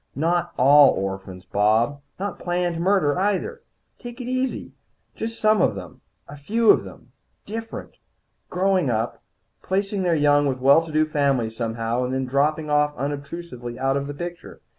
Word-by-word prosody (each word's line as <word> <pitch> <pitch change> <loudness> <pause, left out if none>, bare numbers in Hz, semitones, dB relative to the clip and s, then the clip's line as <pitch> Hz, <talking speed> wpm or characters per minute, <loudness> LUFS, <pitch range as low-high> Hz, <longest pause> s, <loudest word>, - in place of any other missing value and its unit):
"Not 170 +4 0
all 140 +2 +7
orphans, 95 -1 -5
Bob. 110 +9 +1 0.2
Not 200 -1 -4
planned 175 -1 -1
murder, 180 -4 +2
either. 210 - -1 0.4
Take 240 0 -9
it 245 - -6
easy. 255 +1 -2 0.4
Just 225 +1 -5
some 215 -3 +3
of - - +2
them. - - -10 0.3
A 145 - -10
few 215 +10 +3
of - - +2
them - - -13 0.3
different. 225 +2 -7 0.5
Growing 185 -4 +1
up. 115 0 -2 0.4
Placing 195 +1 -1
their 175 -2 +2
young 145 -1 +3
with 130 -2 -1
well 140 +5 +5
to 165 - -9
do 155 0 +2
families 135 -7 0
somehow, 115 +1 -2
and 125 +1 -2
then 130 0 -1
dropping 150 +4 0
unobtrusively 145 -3 -2
out 135 +1 0
of 140 0 -2
the 145 - -6
picture. 175 +2 -8
150 Hz, 160 wpm, -23 LUFS, 130-185 Hz, 0.5 s, all